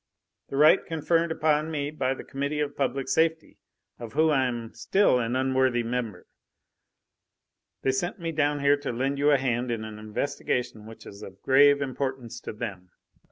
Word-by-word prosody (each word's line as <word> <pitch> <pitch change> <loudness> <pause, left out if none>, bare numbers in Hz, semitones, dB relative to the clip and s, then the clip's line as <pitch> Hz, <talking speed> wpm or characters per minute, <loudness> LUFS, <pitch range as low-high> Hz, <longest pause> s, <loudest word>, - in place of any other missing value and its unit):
"The 135 - -4
right 150 +2 +6
conferred 165 +1 0
upon 155 -1 +1
me 145 -2 -3
by 135 -3 -1
the - - -9
Committee 140 +2 -3
of 145 -1 -2
Public 135 -1 -1
Safety, 160 0 0 0.4
of 115 -2 -8
whom 155 +1 +3
I 135 -3 +2
am 120 -2 -5
still 160 - +2
an 120 +1 -1
unworthy 130 -2 +1
member. 115 -5 -4 1.6
They 135 - +3
sent 175 +7 -2
me 165 -1 -3
down 145 -2 0
here 140 +1 +4
to 145 -2 -4
lend 135 +4 -2
you 145 +1 +3
a 145 - +5
hand 125 -2 -1
in 115 -2 -2
an 110 -1 -8
investigation 110 0 -3
which 115 - -12
is 100 +1 -11
of 95 -2 -12
grave 140 +1 +5
importance 130 -3 -4
to - - -7
them." 100 -5 -7
135 Hz, 175 wpm, -26 LUFS, 120-145 Hz, 1.6 s, right